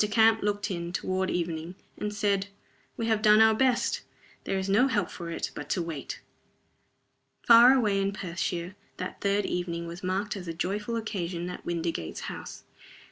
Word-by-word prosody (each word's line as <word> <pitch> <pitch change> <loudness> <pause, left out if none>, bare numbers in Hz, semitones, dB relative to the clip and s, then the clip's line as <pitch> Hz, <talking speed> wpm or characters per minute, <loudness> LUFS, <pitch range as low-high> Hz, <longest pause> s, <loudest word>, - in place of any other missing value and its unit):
Camp 220 +1 +5
looked 205 0 -1
in, 170 -1 -3
toward 185 +1 -1
evening, 170 0 -3 0.2
and 210 - -3
said, 200 -1 0 0.5
"We 230 - -1
have 220 -2 +1
done 215 0 +6
our 220 0 +7
best. 255 +1 +1 0.4
There 195 - -1
is 190 0 -2
no 205 +7 +4
help 205 -9 0
for 170 -2 -7
it 165 - -3
but 145 - -7
to 180 - 0
wait." 165 -4 -6 1.2
Far 235 +2 +9
away 210 -6 +2
in 195 0 0
Perthshire 175 -1 -3 0.2
that - - -6
third 200 0 +1
evening 170 -1 -2
was 170 +2 -8
marked 195 +3 -1
as 185 -3 -7
a 165 - -4
joyful 205 +7 -2
occasion 180 -6 -3
at - - -9
Windygates 165 - -3
House. - - -7
195 Hz, 170 wpm, -28 LUFS, 175-210 Hz, 1.2 s, Far